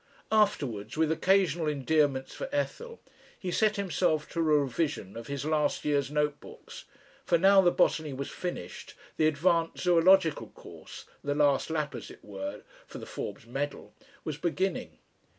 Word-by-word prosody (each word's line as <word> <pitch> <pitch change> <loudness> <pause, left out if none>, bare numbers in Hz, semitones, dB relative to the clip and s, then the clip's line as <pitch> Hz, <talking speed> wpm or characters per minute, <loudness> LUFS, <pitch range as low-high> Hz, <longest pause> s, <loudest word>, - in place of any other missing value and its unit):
Afterwards, 140 - +1
with 160 0 +2
occasional 175 -2 +2
endearments 145 -2 +1
for - - -6
Ethel, 465 +11 -3 0.4
he 185 - -4
set 215 +3 +2
himself 175 -5 0
to 170 - -5
a - - +3
revision 145 - 0
of 115 0 -8
his 140 0 -4
last 150 -1 0
year's 145 -2 +1
note 150 0 0
books, - - -12 0.4
for 170 - +3
now 195 +3 +6
the 180 - +5
botany 155 -3 +1
was 135 +1 -5
finished, 135 - -6 0.2
the 155 - +4
advanced 165 +2 +1
zoological 175 -2 +4
course - - -12 0.2
the 145 0 -1
last 145 -1 +2
lap, 155 -2 -2
as - - -7
it - - -14
were, 290 0 -6 0.2
for - - -9
the - - -8
Forbes - - -6
medal 140 +5 -5 0.3
was 155 -2 -4
beginning. 185 +3 -2
155 Hz, 155 wpm, -29 LUFS, 145-180 Hz, 0.4 s, now